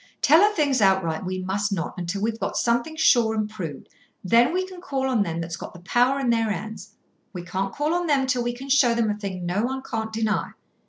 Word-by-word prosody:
Tell 315 Hz, +5 st, +6 dB
her 415 Hz, +1 st, +5 dB
things 280 Hz, -5 st, +1 dB
outright 190 Hz, -4 st, +2 dB
we 185 Hz, 0 st, -3 dB
must 195 Hz, +3 st, -2 dB
not, 170 Hz, -5 st, -2 dB
until 180 Hz, +3 st, -4 dB
we've 225 Hz, 0 st, -1 dB
got -, -, -3 dB
something 240 Hz, +6 st, 0 dB
sure 235 Hz, -8 st, +4 dB
and 215 Hz, -1 st, 0 dB
proved. 180 Hz, -10 st, -7 dB, 0.4 s
Then 235 Hz, -, +4 dB
we 370 Hz, +2 st, 0 dB
can 370 Hz, -1 st, -11 dB
call 270 Hz, -5 st, -2 dB
on 250 Hz, -5 st, +1 dB
them 165 Hz, -4 st, -2 dB
that's 165 Hz, 0 st, -5 dB
got -, -, -9 dB
the -, -, -10 dB
power 245 Hz, +8 st, +2 dB
in 255 Hz, -3 st, +1 dB
their 225 Hz, -1 st, +1 dB
hands. 210 Hz, +1 st, -6 dB, 0.4 s
We 180 Hz, -2 st, -6 dB
can't 190 Hz, +2 st, -3 dB
call 295 Hz, +7 st, -1 dB
on 350 Hz, 0 st, 0 dB
them 280 Hz, -3 st, +2 dB
till 255 Hz, -2 st, 0 dB
we 240 Hz, 0 st, -1 dB
can 260 Hz, +3 st, -9 dB
show 265 Hz, -4 st, +4 dB
them 225 Hz, -2 st, +1 dB
a -, -, -2 dB
thing 190 Hz, -4 st, -5 dB
no 180 Hz, +4 st, 0 dB
one 265 Hz, +3 st, -2 dB
can't 220 Hz, -3 st, -4 dB
deny. 220 Hz, -1 st, -1 dB
225 Hz, 235 wpm, -24 LUFS, 195-265 Hz, 0.4 s, Tell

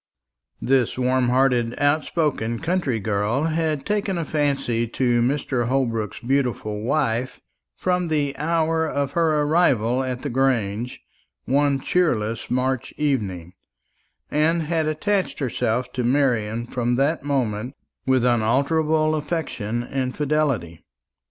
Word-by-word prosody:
This 130 Hz, -3 st, +1 dB
warm 130 Hz, 0 st, +2 dB
hearted 125 Hz, -2 st, +2 dB
outspoken 145 Hz, -5 st, 0 dB
country 160 Hz, -6 st, -1 dB
girl 105 Hz, +6 st, 0 dB
had 160 Hz, -3 st, -1 dB
taken 205 Hz, -3 st, -1 dB
a 165 Hz, -, -2 dB
fancy 140 Hz, -7 st, 0 dB
to 120 Hz, 0 st, +1 dB
Mr. 130 Hz, -1 st, 0 dB
Holbrook's 115 Hz, -5 st, -1 dB
beautiful 120 Hz, -5 st, -1 dB
wife 125 Hz, -1 st, -1 dB, 0.4 s
from 180 Hz, -1 st, 0 dB
the 145 Hz, -3 st, 0 dB
hour 160 Hz, 0 st, +1 dB
of 140 Hz, -2 st, -1 dB
her 155 Hz, -2 st, +2 dB
arrival 135 Hz, -6 st, +2 dB
at 130 Hz, -1 st, -4 dB
the 145 Hz, -, -2 dB
Grange, 120 Hz, -3 st, 0 dB, 0.5 s
one 140 Hz, +1 st, +2 dB
cheerless 115 Hz, -10 st, 0 dB
March 130 Hz, 0 st, -1 dB
evening, 100 Hz, -, -2 dB, 0.8 s
and 160 Hz, +2 st, +2 dB
had 160 Hz, 0 st, 0 dB
attached 190 Hz, +6 st, 0 dB
herself 125 Hz, -2 st, -1 dB
to 125 Hz, -, -2 dB
Marian 120 Hz, -4 st, +1 dB
from 120 Hz, 0 st, -1 dB
that 140 Hz, +5 st, +1 dB
moment 125 Hz, -3 st, -1 dB, 0.3 s
with 130 Hz, -2 st, +3 dB
unalterable 150 Hz, +7 st, +2 dB
affection 150 Hz, -8 st, -2 dB
and 130 Hz, 0 st, -3 dB
fidelity. 140 Hz, -, -1 dB
135 Hz, 120 wpm, -23 LUFS, 120-155 Hz, 0.8 s, with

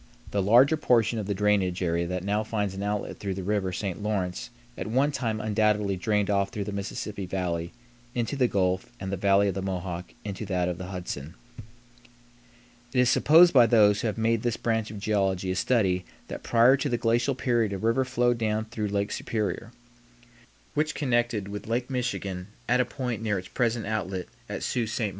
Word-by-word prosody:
The 100 Hz, -, +1 dB
larger 125 Hz, +10 st, +5 dB
portion 120 Hz, -5 st, +2 dB
of 100 Hz, -, -4 dB
the 100 Hz, -, -1 dB
drainage 95 Hz, -2 st, +1 dB
area 85 Hz, 0 st, 0 dB
that 90 Hz, 0 st, -3 dB
now 105 Hz, +2 st, 0 dB
finds 105 Hz, -3 st, -2 dB
an 95 Hz, -, -6 dB
outlet 105 Hz, 0 st, -3 dB
through 100 Hz, -2 st, -3 dB
the 95 Hz, -, -5 dB
River 100 Hz, -1 st, 0 dB
St. 95 Hz, 0 st, -4 dB
Lawrence 100 Hz, -4 st, -2 dB, 0.3 s
at -, -, -5 dB
one 135 Hz, +6 st, +2 dB
time 115 Hz, -6 st, -2 dB
undoubtedly 105 Hz, -2 st, +1 dB
drained 105 Hz, +2 st, 0 dB
off 100 Hz, -1 st, +1 dB
through 105 Hz, -4 st, -4 dB
the 105 Hz, -, -5 dB
Mississippi 100 Hz, 0 st, -4 dB
Valley 85 Hz, -2 st, -2 dB, 0.4 s
into 120 Hz, +3 st, -1 dB
the 130 Hz, -3 st, +3 dB
Gulf 95 Hz, -2 st, 0 dB
and 95 Hz, 0 st, -4 dB
the -, -, 0 dB
Valley 100 Hz, +1 st, +3 dB
of -, -, -2 dB
the 95 Hz, -, -3 dB
Mohawk 90 Hz, -2 st, -4 dB
into 100 Hz, +1 st, -4 dB
that 90 Hz, -2 st, 0 dB
of 90 Hz, 0 st, -3 dB
the 90 Hz, -, -6 dB
Hudson. 90 Hz, -5 st, -6 dB, 1.6 s
It 125 Hz, -, +1 dB
is 125 Hz, -1 st, +4 dB
supposed 170 Hz, +4 st, +6 dB
by 120 Hz, -4 st, +7 dB
those 105 Hz, -3 st, +5 dB
who -, -, 0 dB
have 110 Hz, -, -3 dB
made 115 Hz, 0 st, +1 dB
this 120 Hz, -1 st, -1 dB
branch 110 Hz, -2 st, -1 dB
of 105 Hz, -, -7 dB
geology 95 Hz, -3 st, 0 dB
a -, -, -1 dB
study 95 Hz, -3 st, +1 dB, 0.3 s
that -, -, -6 dB
prior 120 Hz, +3 st, +5 dB
to 140 Hz, +1 st, -1 dB
the 120 Hz, -, +1 dB
glacial 120 Hz, +3 st, +1 dB
period 120 Hz, -5 st, +1 dB
a 100 Hz, -, -2 dB
river 115 Hz, +6 st, +1 dB
flowed 125 Hz, -2 st, +1 dB
down 110 Hz, -1 st, 0 dB
through 110 Hz, -1 st, -3 dB
Lake 100 Hz, 0 st, -1 dB
Superior, 105 Hz, -1 st, -3 dB, 1.0 s
which 155 Hz, +1 st, 0 dB
connected 120 Hz, -6 st, 0 dB
with 105 Hz, +1 st, -7 dB
Lake 120 Hz, +3 st, -1 dB
Michigan 100 Hz, -7 st, -3 dB, 0.2 s
at 125 Hz, +1 st, +3 dB
a -, -, +1 dB
point 125 Hz, -4 st, -4 dB
near 105 Hz, -3 st, 0 dB
its 90 Hz, 0 st, -7 dB
present 120 Hz, -2 st, 0 dB
outlet 95 Hz, -4 st, -2 dB, 0.2 s
at -, -, -4 dB
Sault 120 Hz, -3 st, -1 dB
Ste. 115 Hz, -, -2 dB
105 Hz, 200 wpm, -27 LUFS, 95-120 Hz, 1.6 s, by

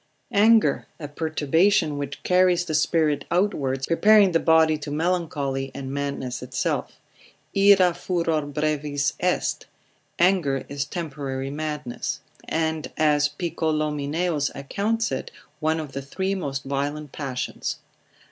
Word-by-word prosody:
Anger, 220 Hz, +2 st, +4 dB
a 150 Hz, -, -5 dB
perturbation, 160 Hz, +3 st, +1 dB
which 140 Hz, -1 st, -6 dB
carries 180 Hz, -1 st, +3 dB
the 160 Hz, -, -4 dB
spirits 155 Hz, -1 st, +2 dB
outwards, 140 Hz, -8 st, 0 dB
preparing 205 Hz, +3 st, +5 dB
the 165 Hz, -, +3 dB
body 160 Hz, -1 st, +4 dB
to 150 Hz, -, -6 dB
melancholy, 150 Hz, -4 st, -1 dB
and 135 Hz, 0 st, -5 dB
madness 140 Hz, -3 st, -3 dB
itself: 125 Hz, -2 st, -2 dB, 0.6 s
Ira 195 Hz, -3 st, +6 dB
furor 165 Hz, -5 st, -1 dB
brevis 150 Hz, -1 st, 0 dB
est, -, -, 0 dB, 0.5 s
anger 170 Hz, -7 st, +2 dB
is 140 Hz, 0 st, -3 dB
temporary 140 Hz, -5 st, -4 dB
madness; 150 Hz, -3 st, -4 dB, 0.3 s
and 160 Hz, -1 st, -1 dB
as 150 Hz, -1 st, +3 dB
Picolomineus 155 Hz, -1 st, -1 dB
accounts 205 Hz, +11 st, -1 dB
it, 130 Hz, -, -3 dB, 0.3 s
one 160 Hz, +1 st, +1 dB
of 150 Hz, -3 st, -6 dB
the 135 Hz, +1 st, -4 dB
three 190 Hz, +8 st, -2 dB
most 140 Hz, -8 st, -3 dB
violent 145 Hz, +1 st, -3 dB
passions. 135 Hz, -4 st, -4 dB
155 Hz, 120 wpm, -24 LUFS, 140-170 Hz, 0.6 s, Ira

